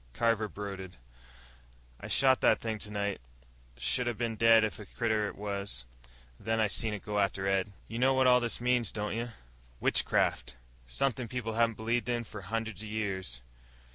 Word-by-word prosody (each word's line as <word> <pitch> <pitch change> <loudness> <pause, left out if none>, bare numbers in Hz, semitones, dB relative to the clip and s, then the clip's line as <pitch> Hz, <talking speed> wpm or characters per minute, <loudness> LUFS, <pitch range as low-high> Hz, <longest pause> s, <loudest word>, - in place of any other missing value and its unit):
Carver 110 - +2
brooded. 95 -3 -7 1.0
"I - - -7
shot 130 -1 +4
that - - +4
thing 110 -2 -3
tonight. 100 - -3 0.6
Should 120 - +1
'a 120 - 0
been 115 0 -2
dead 115 0 +6
if 110 - -2
a 105 - -9
critter 110 -2 0
ever - - -8
was. 100 -10 -4 0.5
Then 110 0 -1
I 110 - +4
seen 105 +1 0
it 105 - -9
go 105 -1 -1
after 95 -1 0
Ed." 95 0 +1 0.2
"You 115 - -5
know 130 +1 +4
what 130 0 +4
all 125 0 +7
this 120 -2 -1
means, 125 -1 +2
don't 105 0 -3
you? 120 +1 -2 0.5
Witchcraft. 60 - +2 0.3
Something 120 - 0
people 115 -2 -3
haven't 115 0 +2
believed 115 +2 -1
in 120 -1 0
for 105 -2 -9
hundreds 110 +2 -3
of 110 - -7
years." 95 - -3
110 Hz, 175 wpm, -31 LUFS, 100-115 Hz, 1.0 s, all